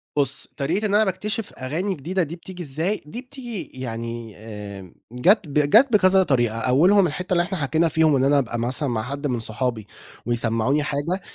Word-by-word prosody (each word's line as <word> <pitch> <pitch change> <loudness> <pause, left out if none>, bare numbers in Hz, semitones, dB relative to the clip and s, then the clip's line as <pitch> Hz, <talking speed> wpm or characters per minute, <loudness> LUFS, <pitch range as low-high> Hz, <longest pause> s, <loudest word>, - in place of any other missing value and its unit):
بُص، 140 -1 +2
طريقة 170 +10 -1
إن 205 -1 +1
أنا 215 - +5
باكتشف 210 +3 -3
أغاني 160 +10 -3
جديدة 175 +5 -1
دي 160 +2 -6
بتيجي 180 +1 -9
إزاي، 165 +8 -2
دي 230 +11 -7
بتيجي 250 -6 -6 0.2
يعني 115 -2 -6
آمم، 100 -4 -9 0.2
جات، 185 - +3
جات 150 - +4
بكذا 190 -1 +5
طريقة 120 -7 +1
أولهم 175 - +4
الحتّة 180 +4 -3
اللي 175 -1 +3
إحنا 190 +1 -4
حكينا 160 +2 +1
فيهم 160 -1 +3
إن 130 - +2
أنا 140 +1 +4
أبقى 120 -3 -3
مثلًا 130 +5 -1
مع 110 -3 -1
حد 140 +4 -4
من 125 -3 -1
صحابي، 110 -1 -2 0.4
ويسمعوني 120 +4 +1
حاجة، 150 +6 -2
145 Hz, 180 wpm, -23 LUFS, 120-185 Hz, 0.4 s, أنا